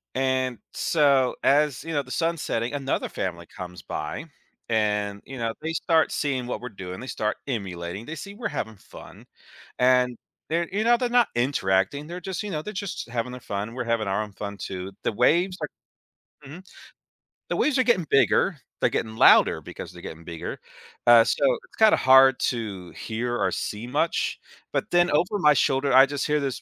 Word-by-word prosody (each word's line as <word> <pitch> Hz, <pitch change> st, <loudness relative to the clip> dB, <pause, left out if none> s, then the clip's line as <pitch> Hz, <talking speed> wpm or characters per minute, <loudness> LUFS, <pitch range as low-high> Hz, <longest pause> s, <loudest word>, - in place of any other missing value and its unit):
And 130 Hz, -2 st, 0 dB
so, 140 Hz, -5 st, +2 dB
as, 145 Hz, -2 st, +2 dB
you 165 Hz, -, -5 dB
know, 145 Hz, -, +1 dB
the 130 Hz, -, -16 dB
sun's 165 Hz, 0 st, -1 dB
setting, 115 Hz, +4 st, -2 dB
another 135 Hz, -1 st, -1 dB
family 85 Hz, -2 st, -4 dB
comes 90 Hz, -1 st, -9 dB
by 75 Hz, -, -5 dB, 0.4 s
and, 105 Hz, -2 st, 0 dB
you 135 Hz, -, -9 dB
know, 115 Hz, -1 st, -1 dB
they 160 Hz, +1 st, -2 dB
start 165 Hz, -1 st, +2 dB
seeing 130 Hz, -4 st, -1 dB
what 125 Hz, -, -4 dB
we're 125 Hz, -, -6 dB
doing. 95 Hz, -4 st, -8 dB
They 130 Hz, -, -8 dB
start 110 Hz, -4 st, -2 dB
emulating. 95 Hz, -5 st, -4 dB
They 155 Hz, -, -6 dB
see 200 Hz, +7 st, -8 dB
we're 230 Hz, +2 st, -3 dB
having 110 Hz, -1 st, -4 dB
fun, -, -, -14 dB, 0.5 s
and 125 Hz, -1 st, +3 dB, 0.3 s
they're, 170 Hz, +1 st, 0 dB
you 210 Hz, +3 st, 0 dB
know, 240 Hz, +1 st, +5 dB
they're 245 Hz, -, 0 dB
not 245 Hz, -1 st, +4 dB
interacting, 120 Hz, +1 st, +1 dB
they're 175 Hz, +3 st, -7 dB
just, 190 Hz, +3 st, -4 dB
you 210 Hz, -, -5 dB
know, 155 Hz, -4 st, -3 dB
they're 210 Hz, -, -6 dB
just 195 Hz, -, -5 dB
having 120 Hz, +1 st, -3 dB
their 125 Hz, -, -8 dB
fun. 105 Hz, +2 st, -4 dB
We're 125 Hz, -, -3 dB
having 115 Hz, -2 st, 0 dB
our 95 Hz, +2 st, 0 dB
own 105 Hz, -1 st, -8 dB
fun, 100 Hz, +1 st, -7 dB
too. 95 Hz, 0 st, -6 dB
The -, -, 0 dB
waves, 170 Hz, -, +2 dB
are 150 Hz, -, -1 dB, 0.8 s
Mhm. 160 Hz, +7 st, -10 dB, 0.9 s
The -, -, 0 dB
waves 290 Hz, -3 st, +2 dB
are -, -, +5 dB
getting 195 Hz, -10 st, +2 dB
bigger. 155 Hz, +5 st, +3 dB, 0.2 s
They're -, -, +4 dB
getting 110 Hz, -1 st, -3 dB
louder -, -, +6 dB
because -, -, -9 dB
they're -, -, -11 dB
getting 80 Hz, +1 st, -9 dB
bigger. 85 Hz, -2 st, -6 dB, 0.5 s
Uh, 120 Hz, -1 st, +9 dB
so -, -, -1 dB, 0.2 s
it's -, -, -22 dB
kinda 220 Hz, -1 st, +6 dB
hard 130 Hz, 0 st, +6 dB
to 100 Hz, -7 st, -3 dB
hear 120 Hz, +2 st, -3 dB
or 95 Hz, -4 st, +1 dB
see 105 Hz, +5 st, -4 dB
much, 150 Hz, +6 st, 0 dB, 0.3 s
but -, -, -2 dB
then 175 Hz, 0 st, +4 dB
over 175 Hz, +7 st, +1 dB
my 150 Hz, -5 st, +6 dB
shoulder, 135 Hz, -1 st, +1 dB
I 135 Hz, +1 st, +9 dB
just 145 Hz, 0 st, -3 dB
hear 150 Hz, 0 st, +2 dB
this 135 Hz, -3 st, -3 dB
130 Hz, 195 wpm, -25 LUFS, 110-155 Hz, 0.9 s, Uh